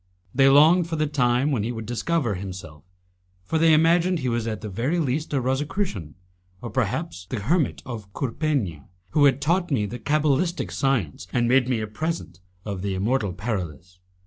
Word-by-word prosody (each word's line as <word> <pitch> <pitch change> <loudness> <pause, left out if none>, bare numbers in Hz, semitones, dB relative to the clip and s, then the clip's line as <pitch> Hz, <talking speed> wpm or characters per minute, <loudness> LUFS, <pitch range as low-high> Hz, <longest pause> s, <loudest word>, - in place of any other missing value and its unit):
They 135 +1 +5
longed 160 +5 +6
for 165 - -2
the 155 -1 +1
time 135 -1 +1
when 125 -6 +1
he 115 +4 -2
would 115 -2 -6
discover 120 +2 -1
himself, 90 -6 -8 0.6
for 160 - -1
they 165 0 +5
imagined 170 +3 +4
he 130 -5 -2
was 115 -1 -1
at 110 -2 -3
the 110 - -5
very 120 - -1
least 155 -1 -1
a 140 - +1
Rosicrucian, 130 - -2 0.4
or - - -7
perhaps 90 +2 -2
the 120 - -3
hermit 155 - 0
of 110 -6 -7
Courpegna, 115 - -2 0.2
who 145 - +4
had 135 -1 +4
taught 175 +5 +1
me 120 -8 +1
the 120 +5 -6
cabalistic 155 +3 0
science 100 - -1
and 120 -1 +1
made 125 0 +3
me 120 -4 0
a - - -2
present 110 - -4 0.3
of 100 -3 -4
the 100 -1 -2
immortal 105 +1 0
Paralis. 90 - -5
125 Hz, 180 wpm, -24 LUFS, 100-155 Hz, 0.6 s, longed